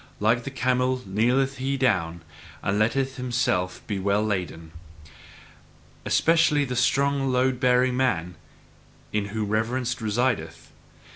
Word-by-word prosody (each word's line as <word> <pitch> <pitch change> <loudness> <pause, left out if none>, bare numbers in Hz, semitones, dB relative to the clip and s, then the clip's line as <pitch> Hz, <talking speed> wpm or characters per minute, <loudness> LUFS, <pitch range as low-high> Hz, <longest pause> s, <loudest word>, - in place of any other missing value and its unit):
Like 115 +3 +1
the - - -3
camel 130 -1 0
kneeleth 125 +7 +1
he 135 +2 -1
down, 85 -10 0 0.4
and 100 +1 0
letteth 130 +5 0
himself 120 -8 -1
be 100 -3 -3
well 100 +2 +1
laden. 90 -5 -3 1.3
Especially 155 -3 +3
the 125 -1 -4
strong 135 +2 +1
load 125 0 +1
bearing 125 0 +3
man 100 -10 0 0.8
in 105 -1 0
whom 105 0 -3
reverence 120 +3 0
resideth. 120 +4 -2
125 Hz, 120 wpm, -25 LUFS, 105-130 Hz, 1.3 s, Especially